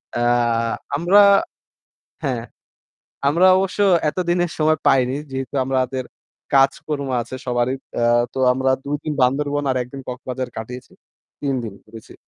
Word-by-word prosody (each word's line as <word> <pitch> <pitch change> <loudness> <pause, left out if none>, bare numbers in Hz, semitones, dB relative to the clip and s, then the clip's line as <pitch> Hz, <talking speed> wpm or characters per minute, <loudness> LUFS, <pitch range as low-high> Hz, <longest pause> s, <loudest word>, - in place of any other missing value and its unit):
অ্যাঁ 120 -1 +1 0.3
আমরা 175 +7 +4 1.0
হ্যাঁ, 130 -6 -2 0.9
আমরা 170 +6 +4
অবশ্য 190 +1 -2 0.3
এতদিনের 175 0 -1
সময় 155 0 +2
পাইনি। 130 0 +3 0.2
যেহেতু 135 +1 -5
আমাদের 130 0 -1 0.5
কাজকর্ম 140 +1 +2
আছে 120 +2 -7
সবারই। 120 +1 0 0.2
অ্যা 120 - +1 0.3
তো - - -4
আমরা 130 +1 +1
২ 145 +1 -1
দিন 155 - -2
বান্দরবন 145 +3 +1
আর - - -2
১ 125 - -6
দিন 135 - -6
কক্সবাজার 125 0 -5
কাটিয়েছি। 125 +3 -8 0.5
৩ 140 -2 -1
দিন 110 -3 -6
ঘুরেছি। 110 0 -13
130 Hz, 130 wpm, -21 LUFS, 125-145 Hz, 1.0 s, আমরা